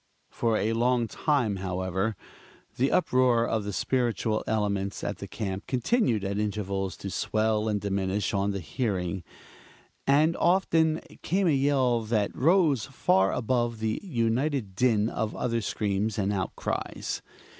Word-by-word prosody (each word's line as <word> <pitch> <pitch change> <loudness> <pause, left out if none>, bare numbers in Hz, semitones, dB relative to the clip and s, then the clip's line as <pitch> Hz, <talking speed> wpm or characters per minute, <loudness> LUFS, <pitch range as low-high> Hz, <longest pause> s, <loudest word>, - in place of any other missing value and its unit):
For 115 -2 +1
a 110 +2 0
long 120 0 +2
time, 125 -7 0
however, 95 +3 -2 0.6
the 135 +3 +1
uproar 125 -7 +3
of 110 -3 -1
the 105 - -3
spiritual 115 -1 0
elements 100 -2 -1
at - - -3
the - - -6
camp 100 -2 -4
continued 130 - +1
at 100 +1 -2
intervals 100 -2 -2
to 100 - -6
swell 110 +1 0
and 105 -1 0
diminish 100 0 -1
on 100 0 +1
the 100 -1 -2
hearing; 95 -3 -2 0.8
and, 155 +4 +4
often 165 -3 +2 0.2
came 195 +2 +1
a 170 - +4
yell 135 -4 +2
that 110 -2 -1
rose 155 - +3
far 95 -7 +2
above 120 -1 0
the 110 0 -2
united 125 - 0
din 110 -3 +3
of 110 -2 -3
other 115 -2 -1
screams 105 0 -1
and 100 0 0
outcries. 95 -2 -3
110 Hz, 140 wpm, -27 LUFS, 100-130 Hz, 0.8 s, and